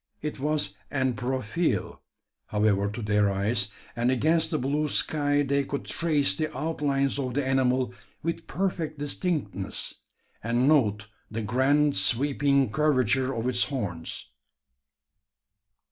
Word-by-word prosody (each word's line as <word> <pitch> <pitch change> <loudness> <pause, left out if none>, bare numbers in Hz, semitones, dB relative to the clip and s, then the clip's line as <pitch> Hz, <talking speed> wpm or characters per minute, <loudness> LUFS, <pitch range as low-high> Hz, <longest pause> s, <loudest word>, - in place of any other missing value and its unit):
It 150 -2 -4
was 145 -9 0
en 130 -3 0
profile, 120 - -1 0.5
however, 105 -1 +2
to 110 +3 -6
their 105 -1 +2
eyes; 100 +2 0 0.3
and 120 +1 +1
against 155 +6 +2
the 155 - 0
blue 145 +3 0
sky 145 0 +1
they 140 0 +1
could 140 +1 -4
trace 150 - +1
the 155 +6 -2
outlines 140 -2 0
of 125 -3 -3
the 145 -1 +1
animal 130 -2 +1 0.3
with 165 0 -3
perfect 170 -5 -2
distinctness, 145 - -2 0.5
and 120 +3 +2
note 105 -9 +3 0.2
the 110 0 -4
grand 140 +6 +3
sweeping 140 0 +2
curvature 130 -2 +2
of 115 -2 -2
its 125 -2 +2
horns. 100 - -4
130 Hz, 125 wpm, -27 LUFS, 115-145 Hz, 0.5 s, note